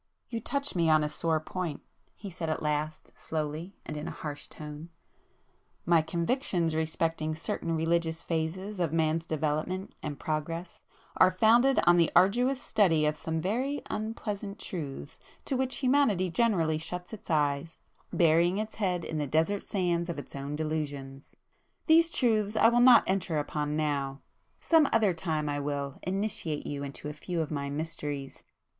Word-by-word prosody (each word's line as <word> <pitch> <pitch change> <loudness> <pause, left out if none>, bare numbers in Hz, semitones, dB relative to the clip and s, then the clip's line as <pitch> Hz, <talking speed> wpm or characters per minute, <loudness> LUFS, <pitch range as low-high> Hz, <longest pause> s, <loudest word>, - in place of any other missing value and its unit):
"You 230 - -3
touch 280 +5 -2
me 170 -3 +2
on 155 -1 +5
a 150 - -1
sore 160 +1 0
point,"—he 180 +4 -7
said 165 -1 -4
at 155 - -2
last, 150 +1 -2
slowly, 155 +4 -4
and 155 - -5
in 150 - -5
a - - -6
harsh 145 -1 -5
tone—"My 160 +2 -5
convictions 170 - 0
respecting 160 0 -1
certain 165 +1 -3
religious 165 0 0
phases 180 +5 -3
of 170 -4 +1
man's 160 0 +1
development 155 +5 -2
and 150 -2 -4
progress, 165 +3 -4 0.3
are 185 - +7
founded 230 +8 +4
on 175 0 +6
the 170 -2 +3
arduous 245 +9 +4
study 175 - +2
of 150 0 +1
some 160 +1 -3
very 250 - -1
unpleasant 210 -2 -4
truths 150 -7 -6 0.3
to 270 - -1
which 260 0 -1
humanity 225 -10 +3
generally 165 -8 +2
shuts 180 +4 -6
its 215 - -10
eyes, 150 0 0 0.3
burying 170 +2 +4
its 215 +1 -3
head 180 -3 0
in 155 - -3
the 145 - -1
desert 160 +8 +1
sands 175 -3 -1
of 170 - -3
its 145 - -8
own 140 +1 -4
delusions. 145 -3 -4 0.5
These 330 +1 +6
truths 220 -8 +2
I 225 - +6
will 240 +1 +3
not 245 -1 +8
enter 190 -4 0
upon 150 0 -2
now. 140 -3 -1 0.4
Some 320 -4 +4
other 215 -4 +3
time 160 -3 -2
I 145 0 -1
will 140 -1 -3
initiate 195 -5 -2
you 145 -1 -4
into 140 +1 -6
a 150 - -4
few 170 +3 -4
of 160 -2 -2
my 140 -2 -2
mysteries." 145 -2 -4
165 Hz, 160 wpm, -29 LUFS, 150-195 Hz, 0.5 s, not